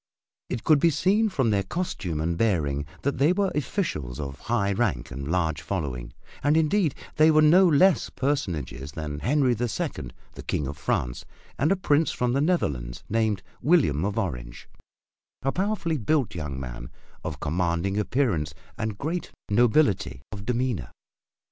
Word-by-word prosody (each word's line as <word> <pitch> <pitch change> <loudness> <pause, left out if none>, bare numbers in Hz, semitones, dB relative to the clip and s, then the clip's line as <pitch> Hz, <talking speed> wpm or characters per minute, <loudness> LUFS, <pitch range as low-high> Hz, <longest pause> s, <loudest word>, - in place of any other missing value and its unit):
It 120 -2 -3
could 155 -2 +5
be 170 - +5
seen 200 +8 +2
from 135 - +1
their 100 -1 +2
costume 95 - -3
and 85 +2 0
bearing 75 -8 0 0.2
that 140 -2 -1
they 145 +5 +5
were 195 0 +1
officials 130 - -2
of 70 -2 -5
high 110 -4 0
rank 95 - -1
and 70 +1 -5
large 80 -4 0
following 70 -8 -3 0.3
and 145 +2 +3
indeed 160 0 +2 0.2
they 155 +1 +6
were 155 -1 +5
no 180 +5 +7
less 175 +3 +4
personages 80 - -2
than 75 -2 -4
Henry 130 - +2
the 120 +1 -1
Second, 65 - -4 0.2
the - - -8
King 75 - -2
of 70 +2 -4
France, 60 -3 -2 0.4
and 150 +7 +3
a - - +5
Prince 160 -4 +2
from 125 0 0
the 135 - +2
Netherlands 70 - -1
named 110 -3 +1 0.2
William 140 - +3
of 100 +2 -1
Orange, 60 - -4 0.8
a 135 - +1
powerfully 185 -4 -1
built 130 +2 +1
young 75 -5 -4
man - - -7 0.3
of 75 -3 -5
commanding 85 +5 0
appearance 100 - 0 0.2
and 110 -2 -2
great 165 - -3 0.2
nobility 105 - +2
of 100 -1 -8
demeanor. 120 - -1
105 Hz, 160 wpm, -26 LUFS, -, 0.8 s, no